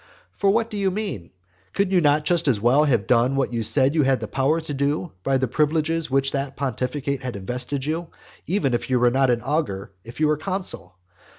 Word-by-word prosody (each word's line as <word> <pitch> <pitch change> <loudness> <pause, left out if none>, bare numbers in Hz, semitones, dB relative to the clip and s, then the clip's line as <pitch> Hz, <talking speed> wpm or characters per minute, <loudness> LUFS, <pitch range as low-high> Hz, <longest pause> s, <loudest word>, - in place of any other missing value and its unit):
For 200 - +1
what 225 +3 +1
do 210 - -4
you 195 -1 +1
mean? 185 - -4 0.4
Could 195 -1 0
you 185 -2 +4
not 150 0 +2
just 170 0 +2
as 120 -7 +2
well 125 +7 +4
have 120 -9 +1
done 125 +2 +2
what 135 -2 -1
you 115 - -1
said 130 +6 +4
you 160 - +3
had 135 -1 +2
now - - -15
the 110 - -4
power 135 +7 +1
to 155 -2 -5
do 145 +5 -1
by 135 +6 +1
the 130 0 0
privileges 155 +4 0
with - - -9
which 135 - 0
that 140 -1 -3
pontificate 140 +2 -2
had 125 -3 -5
invested 125 +7 -3
you, 165 +3 -2 0.4
even 160 -8 0
if 120 - -2
you 125 -1 +2
were 120 0 +4
not 135 +1 +2
an 120 -2 +1
augur, 135 -10 -2
if 115 +4 -12
you 155 - +3
were 150 0 +1
consul? 185 - -4
140 Hz, 230 wpm, -23 LUFS, 125-160 Hz, 0.4 s, you